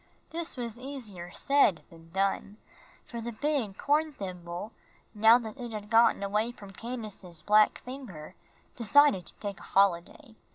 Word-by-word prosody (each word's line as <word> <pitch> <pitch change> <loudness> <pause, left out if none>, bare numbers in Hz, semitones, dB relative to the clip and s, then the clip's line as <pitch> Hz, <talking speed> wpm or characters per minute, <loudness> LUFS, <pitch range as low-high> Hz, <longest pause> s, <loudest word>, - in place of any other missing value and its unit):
This 330 -3 -4
was 235 -1 -5
easier 230 -10 -7
said 220 - +3
than 165 0 -16
done, 195 +3 -1 0.5
for 235 -1 -6
the 235 +1 -4
big 240 -5 -2
horn 305 +2 +2
thimble, 180 -3 -6 0.4
now 220 +2 +7
that 235 +1 -7
it 240 -2 -6
had 210 -1 -7
gotten 230 -2 +5
away 210 +4 0
from 200 -5 -12
Candace's 205 -8 -7
black 210 +2 +5
finger, 245 - -9 0.4
decided 245 -4 +4
to - - -9
take 200 -2 -6
a - - -14
holiday. 195 +3 +2
215 Hz, 150 wpm, -29 LUFS, 195-250 Hz, 0.5 s, now